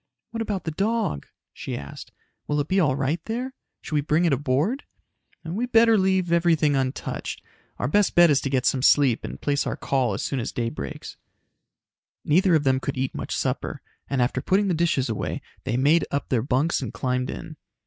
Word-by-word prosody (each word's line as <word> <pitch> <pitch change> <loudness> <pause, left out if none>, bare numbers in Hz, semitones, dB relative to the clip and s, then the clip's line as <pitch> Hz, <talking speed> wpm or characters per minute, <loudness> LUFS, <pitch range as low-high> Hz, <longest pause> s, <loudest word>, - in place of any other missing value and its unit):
"What 230 - -4
about 205 -4 -2
the 160 - -3
dog?" 200 - -1 0.3
she - - -5
asked. 70 0 -9 0.4
"Will 150 0 0
it 145 - -1
be 190 +2 +2
all 145 -7 +3
right 140 +4 -1
there? 250 +4 -3 0.3
Should - - -8
we 150 - +3
bring 155 +4 +1
it 165 - +3
aboard?" 145 - 0 0.6
"We 200 +10 -2
better 230 -1 +5
leave 190 -3 +2
everything 165 -4 +3
untouched. 130 0 -3 0.3
Our - - -1
best 205 +8 +2
bet 175 -2 +7
is 140 -3 +3
to 135 - -2
get 130 -2 0
some 130 - +2
sleep 135 -3 +4
and - - -6
place 140 -1 0
our - - -2
call 130 -7 0
as - - -4
soon 135 - -2
as 115 - -3
day 115 -1 -2
breaks." 70 -9 -7 1.1
Neither 180 +3 +4
of 155 - +2
them 130 -1 +2
could 135 0 -4
eat 130 0 -1
much - - -4
supper - - -2 0.3
and 135 -3 +2
after 130 +1 -1
putting 195 +5 +2
the - - +2
dishes 160 -5 +1
away, 110 -3 -3 0.3
they 125 -2 0
made 150 +6 +3
up 140 - -3
their 125 -4 +2
bunks 140 +6 +1
and 125 -5 -4
climbed 125 +2 -2
in. 160 - -7
145 Hz, 200 wpm, -24 LUFS, 130-180 Hz, 1.1 s, bet